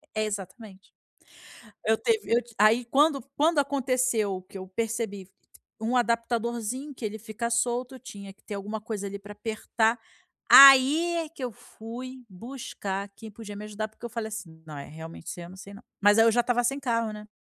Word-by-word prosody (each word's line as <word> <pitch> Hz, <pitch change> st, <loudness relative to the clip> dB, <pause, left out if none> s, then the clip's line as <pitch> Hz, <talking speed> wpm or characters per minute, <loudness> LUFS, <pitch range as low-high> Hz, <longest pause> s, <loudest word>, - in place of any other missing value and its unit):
É, 215 Hz, -, +1 dB
exatamente. 200 Hz, 0 st, -7 dB, 1.1 s
Eu 220 Hz, 0 st, +3 dB
teve 440 Hz, -, 0 dB
eu 240 Hz, -, +4 dB
ti 235 Hz, -1 st, -18 dB
aí, 220 Hz, +4 st, +4 dB
quando 280 Hz, +2 st, +3 dB
quando 310 Hz, +1 st, +3 dB
aconteceu 255 Hz, -8 st, 0 dB
que 195 Hz, -, -11 dB
eu 190 Hz, 0 st, -8 dB
percebi 215 Hz, -2 st, -3 dB, 0.5 s
um 235 Hz, +3 st, +1 dB
adaptadorzinho 235 Hz, +3 st, -1 dB
que 240 Hz, -, -12 dB
ele 215 Hz, +1 st, -3 dB
fica 225 Hz, +2 st, -4 dB
solto, 245 Hz, +2 st, -1 dB
tinha 200 Hz, -5 st, -10 dB
que -, -, -32 dB
ter 210 Hz, -, -7 dB
alguma 210 Hz, +2 st, -5 dB
coisa 210 Hz, -2 st, -5 dB
ali 200 Hz, +1 st, -6 dB
pra 205 Hz, +1 st, -10 dB
apertar, 220 Hz, +2 st, 0 dB, 0.5 s
aí 275 Hz, +6 st, +9 dB
é 320 Hz, -2 st, -3 dB
que 285 Hz, -5 st, -9 dB
eu 245 Hz, -, -2 dB
fui 250 Hz, +5 st, -10 dB
buscar 200 Hz, -2 st, -6 dB
quem 220 Hz, -1 st, -10 dB
podia 210 Hz, -1 st, -9 dB
me 210 Hz, +1 st, -7 dB
ajudar, 215 Hz, +1 st, -4 dB
porque 220 Hz, +2 st, -12 dB
eu 235 Hz, -, -5 dB
falei 225 Hz, -2 st, -4 dB
assim: 170 Hz, -7 st, -8 dB
“Não, 155 Hz, -, -9 dB
realmente 160 Hz, +1 st, -10 dB
isso -, -, -6 dB
eu 170 Hz, -, -9 dB
não 185 Hz, -, -12 dB
sei 200 Hz, +1 st, -11 dB
não”, 200 Hz, -, -13 dB, 0.2 s
mas 205 Hz, +1 st, +5 dB
aí 225 Hz, -, +6 dB
eu 230 Hz, -, +5 dB
já 240 Hz, -, +2 dB
estava 245 Hz, 0 st, +1 dB
sem 275 Hz, +4 st, 0 dB
carro, 230 Hz, -4 st, -1 dB
né. 210 Hz, 0 st, -10 dB
225 Hz, 195 wpm, -27 LUFS, 205-250 Hz, 1.1 s, aí